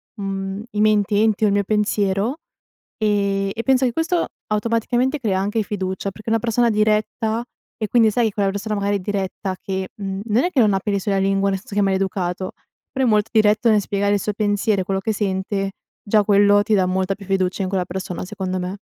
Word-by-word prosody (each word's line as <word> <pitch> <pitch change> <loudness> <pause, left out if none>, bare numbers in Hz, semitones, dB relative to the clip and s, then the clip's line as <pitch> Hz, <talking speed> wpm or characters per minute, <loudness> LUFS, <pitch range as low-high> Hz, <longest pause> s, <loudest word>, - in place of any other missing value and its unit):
mhmm, 195 0 -4
i 210 - -1
miei 215 0 +5
intenti 210 +1 +1
o - - +4
il 200 - +2
mio 200 0 +2
pensiero, 210 - 0 0.6
ehm, 200 -2 +1
e 230 - -4
penso 265 -1 +3
che 240 - 0
questo 335 +1 0 0.2
automaticamente 230 +5 0
crea 195 -6 0
anche 210 +3 0
fiducia, 190 -1 -3
perché 215 +3 -8
una 225 0 +2
persona 235 +1 +2
diretta 220 +2 +1 0.4
e 215 - -1
quindi, 230 -3 +5
sai, 235 +1 +2
che - - -12
quella 200 -2 +1
persona 210 +2 -3
magari 200 0 0
è - - -7
diretta 190 -1 -3
che, 190 -1 -3
mhmm, 195 -1 -4
non 230 +4 +2
è 355 - +1
che 275 - +1
non 210 -4 +4
ha 195 - +1
peli 200 0 -1
sulla 195 0 -1
lingua, 195 0 +2
nel 195 -1 -1
senso 200 0 -10
che 205 - +3
è - - +3
maleducato, 190 -1 -1 0.4
però 265 -1 0
è - - +3
molto 210 -1 +2
diretto 215 +2 +4
nel 210 -2 +4
spiegare 200 +1 0
il - - 0
suo 210 - -2
pensiero 205 -1 +1
e - - -1
quello 195 +1 -1
che 220 +2 -1
sente; 195 -1 -2 0.3
già 210 0 +3
quello 205 0 +4
ti 220 0 0
dà 185 -2 +3
molta 190 +1 0
più 200 - -12
fiducia 190 0 0
in 185 - -2
quella 185 -2 -1
persona 180 0 -5
secondo 185 -2 -3
me. 180 +3 -4
205 Hz, 220 wpm, -21 LUFS, 195-215 Hz, 0.6 s, miei